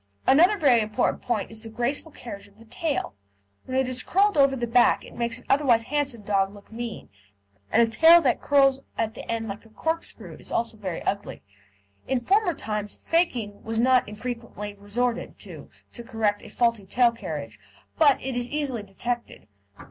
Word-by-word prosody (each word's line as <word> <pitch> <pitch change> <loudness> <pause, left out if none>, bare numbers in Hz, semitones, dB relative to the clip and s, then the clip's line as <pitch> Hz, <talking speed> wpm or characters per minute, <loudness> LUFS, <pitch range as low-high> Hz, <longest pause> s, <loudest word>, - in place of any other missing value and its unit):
Another 350 +10 +5
very 265 - +4
important 215 0 0
point 230 -4 -2
is 220 -1 -6
the 225 - -9
graceful 245 +8 -2
carriage 230 -7 -9
of 200 - -24
the 230 - -16
tail. 290 - -2 0.5
When 260 - -2
it 265 -1 +2
is 250 0 +1
curled 405 +7 +2
over 275 -2 +4
the 240 -2 -2
back 240 +1 +3
it - - -13
makes 235 0 -1
an 255 - -13
otherwise 265 -5 +3
handsome 275 -4 -2
dog 195 -1 +1
look 205 - -16
mean, 230 0 -6 0.6
and 235 - +5
a - - +2
tail 325 +7 +8
that - - +1
curls 275 -2 +4 0.2
at 225 -1 -1
the - - -10
end 225 -1 -2
like 200 0 -7
a 225 - -18
corkscrew 320 +9 -3
is - - -7
also 230 -1 -1
very 190 -5 -5
ugly. 200 +1 -3 0.6
In 265 -1 +1
former 380 - +2
times 210 -1 -4
"faking" 245 - 0
was 225 0 -2
not 255 -1 +3
infrequently 215 -2 -6
resorted 230 +4 -2
to - - -11 0.2
to 235 - -8
correct 225 -4 -1
a - - -12
faulty 230 -5 0
tail 240 +3 +4
carriage, 150 - -7 0.4
but 290 -4 +5
it 265 -1 -3
is 245 0 -1
easily 285 -6 -2
detected. 235 - -5
235 Hz, 185 wpm, -25 LUFS, 215-270 Hz, 0.6 s, tail